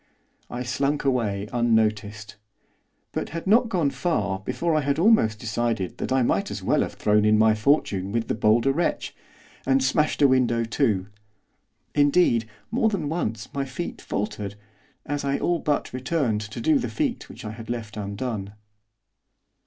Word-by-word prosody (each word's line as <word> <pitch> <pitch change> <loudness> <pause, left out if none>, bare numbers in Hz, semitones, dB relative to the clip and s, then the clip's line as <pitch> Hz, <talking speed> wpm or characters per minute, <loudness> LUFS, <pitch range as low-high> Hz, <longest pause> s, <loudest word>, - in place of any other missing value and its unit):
I 125 +1 -4
slunk 140 +4 -1
away 105 -7 0
unnoticed. 110 -3 0 0.8
But - - -3
had 165 +1 -6
not 225 +4 +4
gone 170 -9 +1
far 100 - -1
before 165 - -1
I 155 - +2
had 140 0 0
almost 165 - +4
decided 110 -3 -2
that - - -3
I 130 -1 +3
might - - +1
as - - -6
well - - +2
have - - -3
thrown 105 0 +2
in 105 0 +4
my 110 0 +5
fortune 105 -5 +1
with 115 +1 -1
the - - 0
bolder 115 +4 +3
wretch, 170 +4 -1 0.5
and 135 0 +2
smashed 150 +3 +2
a - - +8
window 125 -3 +2
too. 115 -5 0 0.9
Indeed, 145 -6 +3 0.2
more 225 -1 +2
than 175 -9 -2
once 115 -9 -3
my 140 - -1
feet 135 +6 -6
faltered, 100 0 -4 0.5
as 145 0 -3
I 140 0 0
all 175 -1 0
but 145 -4 -1
returned 130 -4 0
to 105 +1 -7
do 310 -3 +3
the - - -3
feat 285 -6 -2
which - - -10
I 105 - -4
had 110 +1 -10
left 115 -3 -4
undone. 100 0 -4
120 Hz, 165 wpm, -25 LUFS, 110-145 Hz, 0.9 s, a